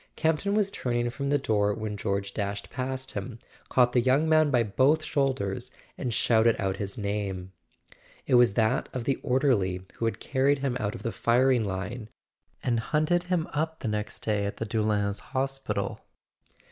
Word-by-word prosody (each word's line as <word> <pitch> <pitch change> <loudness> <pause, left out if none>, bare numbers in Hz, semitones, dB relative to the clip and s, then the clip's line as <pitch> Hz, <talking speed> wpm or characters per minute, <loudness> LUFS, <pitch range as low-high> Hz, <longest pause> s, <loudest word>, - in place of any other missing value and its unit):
Campton 165 +6 +1
was 205 -2 +2
turning 120 -5 -1
from 140 +2 -3
the 145 - +4
door 105 -5 +1
when 110 -2 -4
George 100 0 -2
dashed 100 -1 -3
past 130 +1 -4
him, 110 +4 -5 0.3
caught 125 -1 +4
the 125 - +4
young 130 +6 +3
man 155 -1 +4
by 125 -4 +3
both 135 +9 +2
shoul¬ 135 -3 +1
ders, 100 +4 -4 0.3
and 125 - -3
shouted 115 0 +3
out 95 0 -1
his 100 -1 -4
name. 100 -3 -3 0.7
It - - -1
was 120 -4 +6
that 110 -1 +1
of 125 - -3
the 135 +2 0
orderly 120 -9 +1
who 115 - -1
had 115 - -1
carried 140 +1 +2
him 135 -2 -1
out 105 0 -2
of - - -9
the 115 - -1
firing 120 +2 +3
line 100 +4 -4 0.5
and 120 -2 +1
hunted 155 +8 +1
him 180 -3 0
up 160 +2 -2
the - - -3
next 105 0 -3
day 105 -2 0
in 100 - -3
the 115 - -3
Doullens 105 -2 0
hospital. 135 +1 -3
120 Hz, 180 wpm, -27 LUFS, 105-135 Hz, 0.7 s, was